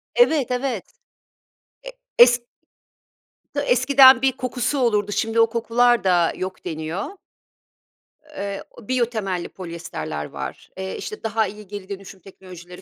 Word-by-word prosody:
Evet, 315 - +3
evet. 250 -5 -1 1.0
E - - -7 0.3
es 240 0 +8 1.1
t - - -1
eskiden 275 - +6
bir 270 0 +3
kokusu 255 +2 -2
olurdu 210 -4 +1
şimdi 225 +3 0
o 225 0 +5
kokular 235 +1 +2
da 175 -3 +3
yok 185 0 -6
deniyor. 160 +3 -4 1.3
Eee, 200 0 -4 0.2
biyo 245 +2 +1
temelli 195 -7 -4
polyester 165 - -6
var, - - -7
eee, 190 0 -5
işte 430 - -7
daha 220 -1 0
iyi 210 0 -10
geri 205 -1 -8
dönüşüm 195 -1 -8
teknolojileri 180 -1 -13
210 Hz, 125 wpm, -22 LUFS, 185-245 Hz, 1.3 s, es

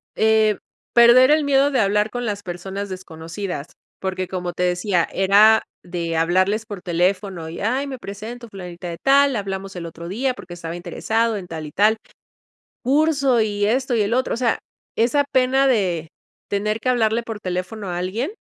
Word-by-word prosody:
Eh, 220 -1 +3 0.4
perder 240 +3 +7
el 305 0 +4
miedo 280 0 +3
de 265 - +1
hablar 210 +1 +2
con 245 +1 -4
las 205 -2 -3
personas 190 +3 -5
desconocidas, 170 -2 -6 0.3
porque 185 -1 -3
como 180 -1 -4
te 180 - -2
decía, 180 0 +1
era 205 +3 +5 0.2
de 170 -2 -3
hablarles 185 +6 +2
por 205 -5 -7
teléfono 180 -1 -1
y: 165 - -7
"Ay, 260 +7 0
me 260 -3 -6
presento 225 +4 -8
Fulanita 180 -2 -8
de 170 - -6
tal, 275 -1 +4
hablamos 195 -1 -4
el 175 -1 -5
otro 170 +1 -8
día 250 +7 -1
porque 180 -8 -11
estaba 165 -1 -6
interesado, 220 +6 -1
en 180 -2 -7
tal 160 -2 -6
y 150 - -8
tal 215 +5 +3 0.9
curso 275 -2 +3
y 205 -2 0
esto 255 +3 +1
y 220 - +3
el 205 +3 0
otro", 255 +1 0
o - - -3
sea, 235 -2 +1 0.4
esa 265 +5 +3
pena 260 +1 +3
de 180 -10 +1 0.4
tener 210 +2 -1
que 255 - -3
hablarle 235 -2 +2
por 225 -2 -7
teléfono 185 +3 -4
a 175 - -3
alguien 215 - -2
205 Hz, 180 wpm, -21 LUFS, 180-235 Hz, 0.9 s, perder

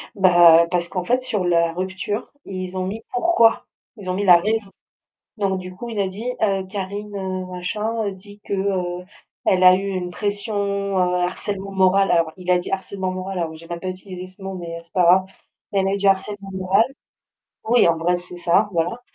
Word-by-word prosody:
Bah 175 -3 +7
parce 175 -1 0
qu'en 180 0 -3
fait 250 +7 +1
sur 215 -6 -1
la 170 -1 +2
rupture, 190 +5 -4
ils 185 -1 -5
ont 185 - -1
mis 215 +4 -5
pourquoi. 245 -5 +3 0.3
Ils 195 -3 -7
ont - - 0
mis 195 +2 -1
la 180 -3 +8
raison. 210 +3 -1 0.7
Donc 195 -2 0
du 185 0 -8
coup 240 +6 -7
il 225 -3 -5
a 200 - +2
dit: 210 +6 -4
«Heu 195 -3 +1
Karine, 200 +1 -5
heu, 185 -1 -3
machin, 210 +5 -3
heu, 200 - -2
dit 205 +2 -13
que, - - -8
heu, 185 -2 -1 0.4
elle 185 -1 +3
a 185 0 +9
eu 195 +2 -2
une 185 -2 -3
pression, 205 +3 -3
heu, 200 -2 0
harcèlement 195 +2 -3
moral» 195 0 +3
alors 165 -2 +3
il 180 -1 -4
a 180 - +5
dit: 175 - -5
«harcèlement 190 0 -3
moral» 185 +1 -4
alors 165 -2 -2
que - - -10
j'ai 165 +1 -13
même 170 0 -5
pas 185 - -4
utilisé 185 0 -7
ce 185 +1 -16
mot, 190 0 -5
mais 170 -2 -6
heu, - - -10
c'est 170 - -32
pas 180 - +3
grave. 185 +2 +6 0.5
«Elle 195 -1 +2
a - - 0
eu - - 0
du 200 0 -1
harcèlement 195 +1 0
moral». 185 0 -5 1.0
Oui, 240 -4 +5
en 170 - +3
vrai, 175 +2 +1
c'est 175 0 -10
ça, 175 +4 +2
voilà. 175 +8 -1
190 Hz, 215 wpm, -22 LUFS, 180-200 Hz, 1.0 s, a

